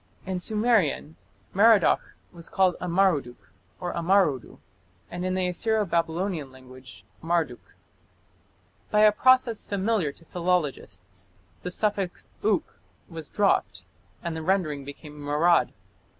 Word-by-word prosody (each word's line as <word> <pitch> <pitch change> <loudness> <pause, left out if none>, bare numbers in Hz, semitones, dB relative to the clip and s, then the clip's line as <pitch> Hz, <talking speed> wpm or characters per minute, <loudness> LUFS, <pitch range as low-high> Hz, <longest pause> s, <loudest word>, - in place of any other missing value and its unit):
In 185 -1 -3
Sumerian 200 - +1 0.4
Merodach 205 -2 +4 0.2
was 170 -1 -11
called 185 -2 +2
Amaruduk 170 -8 0 0.3
or 175 -1 -4
Amarudu, 170 - +1 0.5
and 175 +1 -5
in 185 0 -1
the 185 -1 0
Assyro 215 +4 0
Babylonian 165 -3 -1
language 130 -3 -14 0.2
Marduk. 165 -7 -2 1.1
By 210 - +3
a 215 0 +7
process 255 0 +3
familiar 200 -5 0
to 165 - -17
philologists 130 - -3 0.3
the 180 - -4
suffix 195 -1 -2
"uk" 210 -3 0 0.3
was 165 -3 -8
dropped 205 -2 +1 0.4
and 170 -2 -3
the 160 - -4
rendering 160 -5 0
became 150 +1 -10
Marad. 150 +4 +2
175 Hz, 115 wpm, -26 LUFS, 150-195 Hz, 1.1 s, a